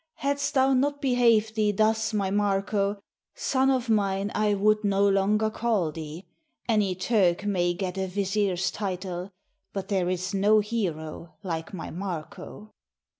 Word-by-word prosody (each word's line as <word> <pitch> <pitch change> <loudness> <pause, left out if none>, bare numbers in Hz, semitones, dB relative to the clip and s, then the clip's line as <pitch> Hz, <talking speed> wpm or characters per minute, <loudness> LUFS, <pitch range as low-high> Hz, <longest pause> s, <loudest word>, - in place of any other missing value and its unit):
Hadst 280 +2 -1
thou 265 0 +4
not 285 +2 +1
behaved 235 -5 +3
thee 215 -1 +2
thus, 220 +2 +1
my 200 -3 -1
Marko, 200 0 0 0.3
Son 265 0 +1
of 260 -2 +1
mine 200 -2 +1
I 210 -1 +2
would 215 +2 +2
no 200 0 +3
longer 205 +2 +2
call 215 -9 0
thee. 160 +3 -8 0.4
Any 210 -5 +2
Turk 185 -2 +1
may 175 -3 +1
get 190 0 -3
a 190 - -1
vizier's 195 -1 0
title, 185 -2 -4 0.4
But 195 -1 -5
there 185 -3 +1
is 185 +1 -2
no 205 +2 +4
hero 170 -7 -4
like 165 -3 -4
my 185 -5 -6
Marko." 185 +3 -7
200 Hz, 145 wpm, -26 LUFS, 185-215 Hz, 0.4 s, thou